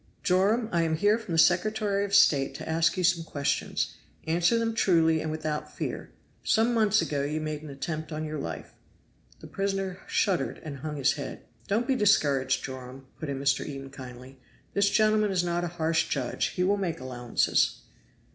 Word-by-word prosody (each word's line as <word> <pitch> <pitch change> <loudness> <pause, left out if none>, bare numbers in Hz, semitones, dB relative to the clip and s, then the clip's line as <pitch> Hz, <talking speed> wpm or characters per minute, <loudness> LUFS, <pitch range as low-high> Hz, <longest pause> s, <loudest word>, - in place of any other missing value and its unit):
"Joram, 205 +5 +2
I 170 - +2
am 160 -1 +1
here 205 +7 +3
from 215 -6 -6
the - - 0
Secretary 200 +4 +3
of 200 0 0
State 140 -9 +4
to - - -7
ask 165 +3 +1
you 185 - 0
some 170 -1 +3
questions. 145 -3 -2 0.3
Answer 170 +7 +2
them 230 0 0
truly 165 -7 +3
and 160 - -3
without 155 -1 -3
fear. - - -4 0.3
Some 225 +2 +2
months 215 -2 +3
ago 145 -2 -2
you 150 +2 -2
made 155 -1 -4
an 155 - -9
attempt 155 +3 -5
on 155 0 -3
your 155 -1 -4
life." 80 - -6 0.7
The - - -10
prisoner 195 -2 -2
shuddered 195 -4 0
and 150 -4 -6
hung 150 +2 -5
his 140 -1 +2
head. 140 -2 -7 0.2
"Don't 220 +4 +1
be 265 - +2
discouraged, 140 - +2
Joram," 130 0 -8
put 155 - -5
in 135 -1 -3
Mr. 140 0 +1
Eden 135 -2 -7
kindly, 130 0 -11 0.3
"this 200 0 +3
gentleman 215 0 +3
is 185 -2 +1
not 175 0 -1
a - - -1
harsh 160 0 +1
judge, 130 -4 -1
he 180 - -2
will 200 +2 +2
make 180 -7 -2
allowances." 125 -2 0
165 Hz, 185 wpm, -27 LUFS, 140-200 Hz, 0.7 s, State